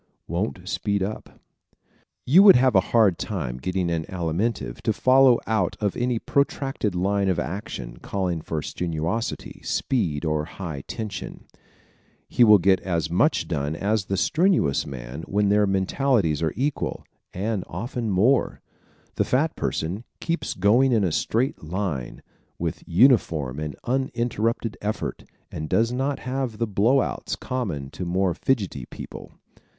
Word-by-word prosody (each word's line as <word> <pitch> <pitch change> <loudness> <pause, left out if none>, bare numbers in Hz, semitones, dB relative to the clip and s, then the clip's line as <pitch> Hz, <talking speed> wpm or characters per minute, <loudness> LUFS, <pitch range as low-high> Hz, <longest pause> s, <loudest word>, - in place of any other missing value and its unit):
Won't 90 +1 -3
Speed 100 0 -1
Up 105 +3 -4
¶ - - -24 0.9
You 165 +9 +7
would 200 -1 +9
have 130 +1 +4
a - - +8
hard 105 -7 +4
time 70 - -3
getting 90 +3 -1
an 80 -1 -1
Alimentive 90 +5 -2
to 110 - +1
follow 130 +2 +5
out 110 -5 0 0.2
any 125 -1 0
protracted 135 -5 -1
line 100 +2 +1
of 90 - +1
action 85 - -5
calling 90 -2 -2
for 75 0 -3
strenuosity, 85 +6 -3
speed 85 - -1
or 75 -1 0
high 85 -5 -6
tension. 110 -3 -6 0.8
He 125 - +3
will 105 -2 +8
get 95 0 +3
as 85 -4 -2
much 145 - +2
done 75 -1 -2
as 100 +2 0
the 95 - -2
strenuous 160 - +2
man 65 +1 -7
when 100 0 +1
their 105 0 +4
mentalities 95 - +1
are 80 -2 0
equal 140 +3 -2 0.3
and 100 +1 -2
often 115 +5 -4
more. 110 +8 +2 0.6
The - - +3
fat 155 +6 +1
person 90 +8 -2 0.2
keeps 170 0 -2
going 120 +8 +4
in 110 -3 +3
a 90 - +1
straight 120 - -1
line, 80 -6 -4 0.3
with - - -3
uniform 85 - +3
and 75 -2 -4
uninterrupted 120 -3 -1
effort, 105 +1 -3 0.3
and 75 0 -5
does 115 +5 +2
not 135 +3 -1
have 130 -3 -3
the 115 - 0
blow 115 +6 +3
outs - - -3
common 90 - -4
to - - -6
more 90 +1 +1
fidgety 95 - -1
people. - - -10
100 Hz, 145 wpm, -24 LUFS, 85-120 Hz, 0.9 s, would